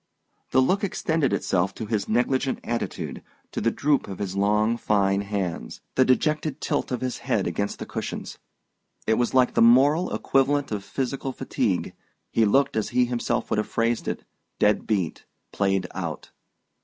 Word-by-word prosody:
The 130 - +4
look 190 +10 +1
extended 160 -6 0
itself 95 +1 0
to 110 - -5
his 105 -1 -2
negligent 130 +4 +1
attitude, 120 0 -3 0.3
to - - -3
the 115 - +3
droop 140 +3 +1
of 95 -2 -6
his 95 -2 -4
long 105 +3 +2
fine 100 -3 +2
hands, 100 -4 -3
the 130 - +4
dejected 150 +3 +1
tilt 145 - -1
of 125 - -2
his 130 -1 -2
head - - 0
against 100 0 -2
the - - -6
cushions. - - -5 0.7
It 110 - +2
was 120 +1 0
like 130 -1 +4
the - - +3
moral 140 +9 +5
equivalent 140 0 +1
of 105 -2 -3
physical 135 +4 -3
fatigue: - - -1 0.4
he 115 - +3
looked, 135 +7 +3
as 110 - 0
he 125 0 +3
himself 120 -1 -2
would 105 - +2
have 105 - -1
phrased 115 0 0
it, - - -3 0.3
dead 105 0 +2
beat, 95 -7 -1 0.3
played 95 -1 +1
out. - - -5
120 Hz, 170 wpm, -25 LUFS, 105-135 Hz, 0.7 s, moral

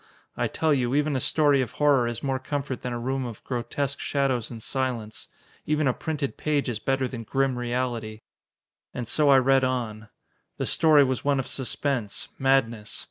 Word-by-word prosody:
I - - 0
tell 160 -2 +1
you, 130 -1 +1
even 150 0 +1
a - - +1
story 145 +1 +3
of 125 -2 -4
horror 140 -5 +3
is 120 -1 -4
more 135 -1 0
comfort 140 -1 -4
than 125 - -4
a 120 - -2
room 130 +3 -2
of 120 -4 -7
grotesque 130 +3 -3
shadows 135 -5 0
and 115 -2 -9
silence. 125 -5 -3 0.4
Even 150 -1 +2
a 130 - +3
printed 150 -2 -3
page 150 -2 0
is 115 -4 -2
better 135 +2 0
than 125 -2 -6
grim 135 +3 0
reality! 120 -3 -3 0.7
And 120 -2 -4
so 150 +4 +2
I 135 - +8
read 135 +1 +4
on. 115 -4 -2 0.5
The - - -2
story 155 -3 +5
was 130 -1 -1
one 140 -1 +2
of 130 - -2
suspense, 130 -4 -2
madness. 120 -5 +1
130 Hz, 185 wpm, -26 LUFS, 120-140 Hz, 0.7 s, I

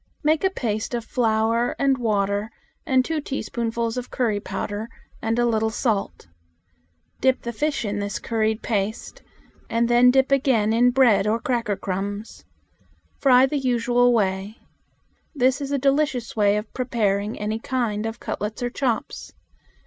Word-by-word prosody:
Make 310 +3 +2
a 380 - +4
paste 225 - -3
of 235 -1 -4
flour 230 -1 +1
and 275 -1 +2
water 205 -2 0 0.4
and 260 -1 +3
two 320 -2 -2
teaspoons 235 -5 -4 0.2
of 250 - -5
curry 225 -5 0
powder 205 +3 -5 0.3
and 225 +1 -1
a 240 - +3
little 220 -1 +1
salt. 220 - -2 0.9
Dip 260 -1 +2
the 235 - -4
fish 295 0 -1
in 205 0 -2
this 205 -1 -3
curried 220 -1 -1
paste, 215 -1 -3 0.5
and 230 +1 +1
then 240 +1 +5
dip 265 +1 +3
again 250 -6 +2
in 245 +2 +4
bread 240 -6 +4
or 220 +2 +1
cracker 235 -3 -1
crumbs. 200 +3 -5 0.8
Fry 255 -2 +6
in 265 - +3
the 290 - -1
usual 245 -1 +2
way. 200 -1 0 0.8
This 260 +1 +2
is 280 0 -4
a 285 - +1
delicious 275 -3 0
way 205 -1 +3
of 210 +1 -6
preparing 215 -4 -1
any 215 +1 -2
kind 225 -4 -2
of 225 +1 -6
cutlets 210 +3 -4
or 245 - -1
chops. 250 -4 -3
230 Hz, 155 wpm, -23 LUFS, 210-255 Hz, 0.9 s, Fry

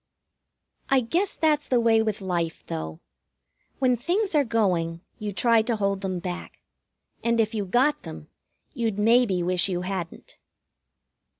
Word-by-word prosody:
I 270 -1 +4
guess 345 - -1
that's 305 -2 +1
the 250 - +2
way 225 -1 +4
with 215 -2 -2
life, 170 -3 -2
though. 80 0 -5 0.8
When 255 -2 +3
things 365 - -1
are 295 -2 +4
going, 180 -8 0 0.2
you 210 -1 -3
try 230 +3 +3
to 230 +1 -1
hold 200 -2 -1
them 190 -2 -2
back. 175 0 -6 0.7
And 235 0 +1
if 220 0 +1
you 210 -2 -2
got 250 +10 +2
them, - - -9 0.5
you'd 230 -7 -2
maybe 215 -4 +3
wish 180 +2 +2
you 180 -1 -1
hadn't. 185 -3 -6
215 Hz, 145 wpm, -25 LUFS, 185-245 Hz, 0.8 s, I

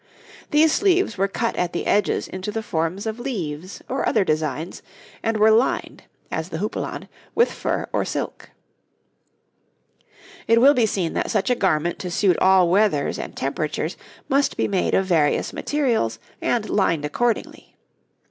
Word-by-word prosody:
These 305 +1 +4
sleeves 380 - +2
were 195 +1 +1
cut 230 +4 -2
at 180 -1 -1
the 170 - -3
edges 205 -1 +1
into 185 +2 -5
the 220 +1 -3
forms 170 +2 -2
of 220 +1 -3
leaves 185 - -5
or 265 - 0
other 215 - +3
designs, 155 0 -2 0.4
and 225 -1 0
were 215 +1 +5
lined, 230 +4 +1 0.3
as 160 +2 -3
the 160 - -4
houppelande, 210 +5 -4 0.3
with 470 - +4
fur - - -2
or - - +1
silk. - - -5 2.0
It 230 0 +5
will 275 +4 +7
be 240 -5 +3
seen 185 -5 -1
that - - -1
such 210 +3 +1
a - - +3
garment 175 -5 0
to 180 - -4
suit 180 0 +2
all 190 -1 +5
weathers 185 -6 +2
and - - -7
temperatures 155 +3 -2 0.3
must 275 +1 +1
be - - +1
made 195 -3 +1
of 195 - +2
various 160 -6 +1
materials 235 - 0 0.2
and 230 -3 0
lined 165 -7 +1
accordingly. 235 +10 -2
195 Hz, 155 wpm, -22 LUFS, 165-230 Hz, 2.0 s, will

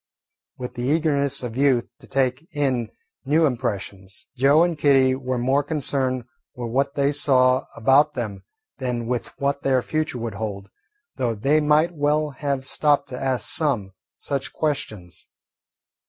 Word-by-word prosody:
With 125 -1 -6
the 120 - -6
eagerness 140 -2 +1
of 120 -2 -5
youth 130 -3 +2
to - - -16
take 130 +3 0
in 130 -6 0 0.3
new 155 +4 +3
impressions, 100 -7 -4
Joe 140 +5 +5
and 175 -1 0
Kitty 135 -3 +4
were 130 -1 -2
more 130 +4 +2
concerned 135 -4 -1 0.3
with 120 -2 -5
what 140 +3 0
they 140 0 +2
saw 130 -3 +3
about 140 +6 +4
them 110 -6 -4 0.4
than 125 -3 -2
with 120 0 -2
what 140 0 0
their 130 -2 +2
future 155 -4 -2
would 115 -2 -4
hold, 100 -1 -5 0.5
though 120 -3 0
they 140 +9 +2
might 150 +3 +3
well 150 0 +1
have 140 -1 -3
stopped 145 -1 +1
to 125 - -6
ask 130 -4 -1
some 125 -12 0 0.3
such 140 -1 -3
questions. 110 - -4
135 Hz, 150 wpm, -23 LUFS, 120-145 Hz, 0.5 s, Joe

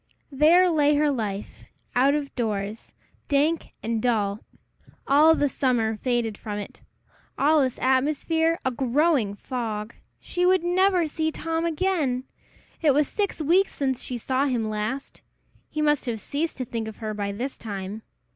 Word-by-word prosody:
There 320 +6 +5
lay 300 -3 +3
her 295 0 +3
life 210 -6 -4 0.3
out 270 +3 +4
of 285 -2 -3
doors 215 -2 -3 0.4
dank 300 +3 +1
and 225 0 -1
dull; 215 -4 0 0.7
all 305 +4 +6
the 290 - +2
summer 240 -5 0
faded 235 -2 -1
from 210 -2 -5
it 205 - -8 0.6
all 300 +2 +4
its 260 -2 0
atmosphere 305 +5 +1
a 260 - +2
growing 260 -3 +1
fog! 220 -2 -4 0.3
She 355 - -2
would 370 -1 +4
never 365 0 +3
see 315 +1 -1
Tom 325 +1 -2
again! 315 -7 0 0.6
It 295 -4 +4
was 295 -1 +3
six 400 -6 -2
weeks 365 +6 +3
since 265 -3 -1
she 250 - -4
saw 260 +4 0
him 235 -5 -1
last! 215 +6 -4 0.5
He 305 - -2
must 295 -3 +2
have 230 -2 -2
ceased 300 +9 -3
to 255 - -3
think 225 -1 -4
of 220 - -7
her 215 -2 -4
by 205 -1 -3
this 245 +7 -4
time! 200 0 -6
265 Hz, 155 wpm, -25 LUFS, 225-310 Hz, 0.7 s, all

